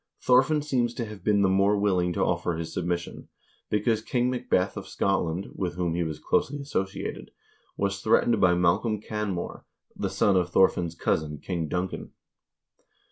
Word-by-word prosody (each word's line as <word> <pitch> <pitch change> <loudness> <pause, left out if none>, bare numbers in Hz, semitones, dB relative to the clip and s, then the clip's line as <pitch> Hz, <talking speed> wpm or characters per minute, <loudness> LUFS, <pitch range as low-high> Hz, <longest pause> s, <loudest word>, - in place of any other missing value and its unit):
Thorfinn 130 +4 +3
seems 120 -5 0
to 120 - -3
have 105 -2 -10
been 100 -1 +3
the - - +4
more 100 +2 +3
willing 90 -3 +1
to - - 0
offer 85 - 0
his 80 0 -5
submission, 85 -1 -3 0.4
because 105 +1 +1
King 125 +2 0
Macbeth 125 -7 0
of - - -7
Scotland, 95 -1 -1
with 90 -3 -3
whom 90 -2 -1
he 85 - -1
was 80 -3 -2
closely 145 - 0
associated, 95 -9 -4 0.5
was 100 0 -1
threatened 115 +2 +3
by 90 -1 +5
Malcolm 90 +5 +2
Canmore, 105 -4 -4 0.3
the - - -2
son 100 - +2
of 90 -1 +2
Thorfinn's 85 -2 +2
cousin 75 -2 -1
King 85 +2 -3
Duncan. 90 +3 -4
95 Hz, 160 wpm, -27 LUFS, 90-110 Hz, 0.5 s, by